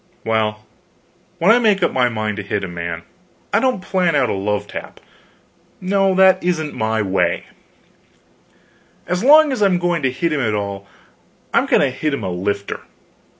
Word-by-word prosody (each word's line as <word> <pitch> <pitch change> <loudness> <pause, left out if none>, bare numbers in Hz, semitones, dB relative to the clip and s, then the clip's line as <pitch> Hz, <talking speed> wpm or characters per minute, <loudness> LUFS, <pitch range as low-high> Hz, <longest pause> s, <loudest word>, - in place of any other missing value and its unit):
Well, 110 -1 -1 0.7
when 180 +6 +4
I 235 - +5
make 215 -4 +2
up - - +2
my 125 -1 +2
mind 110 -2 -3
to - - -3
hit 100 0 -3
a - - -3
man, 85 -1 -5 0.5
I 200 - +4
don't 255 -6 0
plan 185 -4 +1
out 140 - +2
a - - 0
love 100 +1 -2
tap; - - -9 0.8
no, 195 0 +1
that 190 0 +5
isn't 160 -4 -1
my 110 0 -1
way; 95 -1 0 1.6
as 180 +3 -2
long 300 +2 +7
as 255 - -3
I'm 195 -3 +3
going 175 -2 -1
to 130 - +1
hit 165 +5 -1
him 145 - 0
at 110 -4 0
all, 100 -1 -4 0.7
I'm - - +2
going - - +3
to 135 - +1
hit 140 +3 -2
him 115 - -7
a 95 - -3
lifter. 100 +3 -3
135 Hz, 180 wpm, -19 LUFS, -, 1.6 s, long